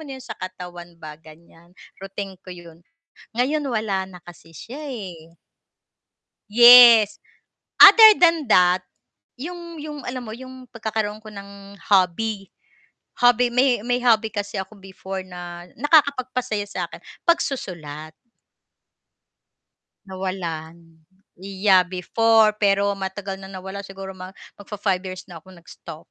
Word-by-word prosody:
na 280 -4 -9
yun 260 - -13
sa 230 - -7
katawan 175 -2 -9
ba 155 -2 -10
ganyan, 165 +2 -19 0.2
routine 195 -1 -8
ko 185 - -19
yun. 170 -2 -12 0.5
Ngayon 265 +6 -1
wala 215 -7 -2
na 180 - -12
kasi 170 -1 -15
siya, 240 - -10
eh. 175 -8 -9 1.2
Yes, 235 -1 +8 0.6
other 435 +1 +10
than 330 -6 +2
that, 180 -2 +4 0.6
yung 340 +4 -9
yung 295 -1 -8
alam 255 0 -5
mo 220 - -8
yung 260 0 -12
pagkakaroon 215 -2 -4
ko 220 - -14
ng 200 0 -12
hobby, 195 +1 0 0.7
hobby, 245 0 +3
may 250 -3 +1
may 245 +1 -1
hobby 225 -2 +2
kasi 205 -1 -6
ako 195 +2 -8
before 190 0 -8
na 175 -1 -10
nakakapagpasaya 255 -6 +1
sa'kin, - - -6 0.2
pagsusulat. 170 - -3 1.9
Nawalan, 170 -4 -7 0.3
yeah 190 0 +2
before, 215 +4 +1
pero 200 0 +1
matagal 195 0 -6
na 190 0 -11
nawala 190 +1 -8
siguro 195 0 -10
mag 185 +1 -11 0.2
mag-fa-five 200 -2 -3
years 185 0 -9
na 175 -3 -12
akong 185 -1 -17
nag-stop. 165 -1 -13
200 Hz, 120 wpm, -21 LUFS, 180-240 Hz, 1.9 s, other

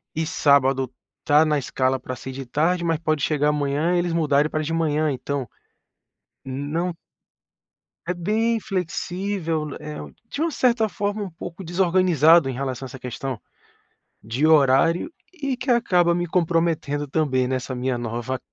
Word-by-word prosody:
e 160 - 0
sábado 135 -4 +3 0.3
está 150 +2 +4
na 150 -2 +1
escala 130 0 0
para 130 0 -6
ser 130 - -7
de 135 +1 -6
tarde, 170 +7 +1
mas 165 -1 +1
pode 155 -2 0
chegar 150 0 +2
amanhã 150 +4 0
e - - +3
eles 175 -1 -1
mudarem 150 -2 +2
para 155 0 -2
de 160 +2 -3
manhã, 155 -2 +1
então 140 0 -3 1.0
não 150 +6 -3 1.1
É 180 - 0
bem 220 +6 +1
flexível, 180 -3 -2
né, 150 - -6
é 150 0 -6
u - - -10 0.2
de 290 - -5
uma 330 - +1
certa 240 -6 +2
forma, 205 +1 -2
um 195 - -5
pouco 170 +2 -8
desorganizado 170 -4 +4
em - - -2
relação 130 0 -4
a - - -8
essa 130 - -10
questão 125 -1 -5 0.8
de 120 +8 0
horário 155 - +4 0.2
e 275 -7 -3
que 255 +2 -5
acaba 180 -8 +3
me 175 - -1
comprometendo 165 -4 0
também, 135 -5 +1
nessa 130 0 -3
minha 125 0 -1
nova 120 +2 -3
155 Hz, 160 wpm, -23 LUFS, 135-175 Hz, 1.1 s, está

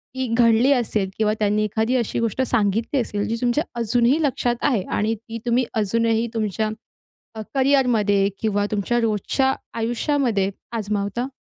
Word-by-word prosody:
ती 260 0 -2
घडली 235 +3 +4
असेल 215 -6 0
किंवा 215 -1 +2
त्यांनी 210 0 +1
एखादी 220 +4 0
अशी 235 -3 -1
गोष्ट 230 +2 -1
सांगितली 230 +2 0
असेल, 205 -3 -3
जी 230 - -1
तुमच्या 245 +5 +1 0.2
अजूनही 240 +6 +2
लक्षात 245 -3 0
आहे 225 -9 0
आणि 215 +2 +1
ती 230 +1 -9
तुम्ही 240 +1 +2
अजूनही 225 +2 +1
तुमच्या 215 -1 -1 0.7
अ, 220 - -6
करिअरमध्ये 240 -8 +3
किंवा 205 -2 0
तुमच्या 210 +4 0
रोजच्या 230 +5 +1 0.2
आयुष्यामध्ये 235 -3 0 0.2
आजमावता? 210 +1 -2
230 Hz, 140 wpm, -22 LUFS, 210-245 Hz, 0.7 s, घडली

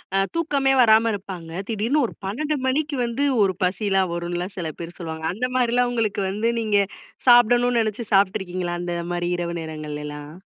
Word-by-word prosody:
அ - - +4 0.2
தூக்கமே 285 -5 +1
வராம 225 -1 +5
இருப்பாங்க. 185 -5 -7 0.2
திடீர்னு 230 +6 0
ஒரு - - -6
12 295 +10 -1
மணிக்கு 290 +3 0
வந்து 235 +4 -1 0.2
ஒரு 190 -1 +2
பசில 195 +1 +1
வரும்னுலாம் 175 +2 -4
சில 170 -3 -3
பேர் 170 0 -8
சொல்லுவாங்க, 160 -2 -6
அந்த 245 +6 -1
மாதிரிலாம் 245 0 +2
உங்களுக்கு 215 -4 0
வந்து 215 +4 0
நீங்க 210 -2 +2 0.5
சாப்டணும்னு 245 0 +5
நெனச்சு 220 +1 -3
சாப்பட்டு 195 -1 +4
இருக்கீங்களா? 180 -1 -3
அந்த 175 0 -3 0.2
மாரி 175 0 -1
இரவு 170 0 -3
நேரங்கள்லலாம்? 150 -1 -7
200 Hz, 160 wpm, -23 LUFS, 175-240 Hz, 0.5 s, வராம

